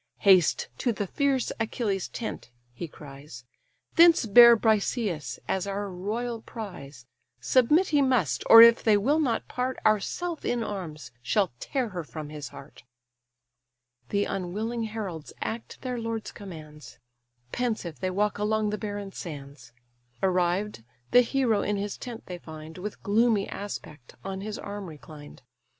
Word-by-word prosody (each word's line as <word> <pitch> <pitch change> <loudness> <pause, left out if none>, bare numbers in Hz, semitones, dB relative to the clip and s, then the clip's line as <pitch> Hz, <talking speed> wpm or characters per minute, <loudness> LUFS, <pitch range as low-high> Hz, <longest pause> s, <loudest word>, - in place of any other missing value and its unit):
"Haste 185 -5 +5
to 245 - +1
the 205 -2 -3
fierce 270 +4 0
Achilles' 215 -4 -1
tent 225 - -6 0.2
(he 165 +8 -6
cries), 140 -4 -12 0.5
Thence 335 -5 +7
bear 235 +2 +9
Briseïs 215 - 0
as 190 +1 -1
our 200 0 -3
royal 225 +6 -3
prize: 150 - -9 0.3
Submit 295 +9 +3
he 295 -2 +3
must; 220 - +1
or 230 0 +12
if 235 0 +7
they 215 -2 +4
will 280 +10 +2
not 245 -7 0
part, 255 +1 -2
Ourself 305 - 0
in 240 -1 0
arms 160 - -6
shall 185 - +1
tear 255 -4 -2
her 180 -4 -5
from 155 -1 -8
his 150 -1 -7
heart." 135 -2 -13 1.3
The 200 0 +1
unwilling 215 +5 -3
heralds 200 -8 -6
act 225 +1 -5
their 250 -2 -3
lord's 225 -1 -4
commands; 155 - -11 0.5
Pensive 215 -10 -2
they 185 - -1
walk 205 +3 0
along 210 0 +1
the 210 - -3
barren 205 -2 -5
sands: 140 -7 -9 0.5
Arrived, 185 - 0 0.3
the 245 - +8
hero 245 -3 +1
in 210 0 -1
his 200 0 -3
tent 240 -2 -8
they 180 -1 -7
find, 160 +1 -10
With 210 +3 -7
gloomy 215 0 +2
aspect 150 -10 -8
on 190 0 -5
his 210 +1 -5
arm 200 -1 -6
reclined. 150 -3 -12
205 Hz, 145 wpm, -27 LUFS, 170-230 Hz, 1.3 s, or